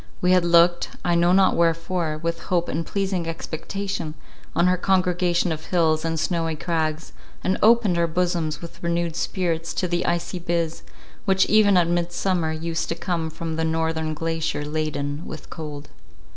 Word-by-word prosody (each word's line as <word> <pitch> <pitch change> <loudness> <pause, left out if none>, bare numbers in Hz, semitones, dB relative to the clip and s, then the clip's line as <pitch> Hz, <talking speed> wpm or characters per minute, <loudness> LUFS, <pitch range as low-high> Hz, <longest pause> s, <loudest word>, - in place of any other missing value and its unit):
We 180 - +2
had 185 -1 +5
looked, 170 0 +4 0.2
I 175 - +2
know 170 +1 +4
not 190 +1 +4
wherefore, 165 -1 0
with 170 +1 -3
hope 175 -2 +1
and 165 +3 -1
pleasing 190 -2 -2
expectation 165 0 -4 0.4
on 170 - +3
her 180 0 +4
congregation 180 -2 +1
of 155 0 -4
hills 160 -3 +2
and 165 -1 -1
snowy 165 -1 -1
crags, 160 0 -2 0.3
and 185 - 0
opened 215 -5 +4
our 170 - +3
bosoms 170 -2 -1
with 170 - -10
renewed 170 -1 -1
spirits 170 -2 -2
to 180 - 0
the 175 0 -1
icy 175 +1 -1
Biz, 170 -1 -1 0.4
which 190 -1 +4
even 205 -3 +5
at 175 -2 +4
Midsummer 175 0 0
used 165 +1 -3
to 165 - -1
come 170 -2 -2
from 160 0 -5
the 160 - 0
northern 160 -1 -1
glacier 165 -1 -2
laden 150 -1 -2
with 155 - -9
cold. 150 -2 -7
170 Hz, 165 wpm, -23 LUFS, 160-180 Hz, 0.4 s, had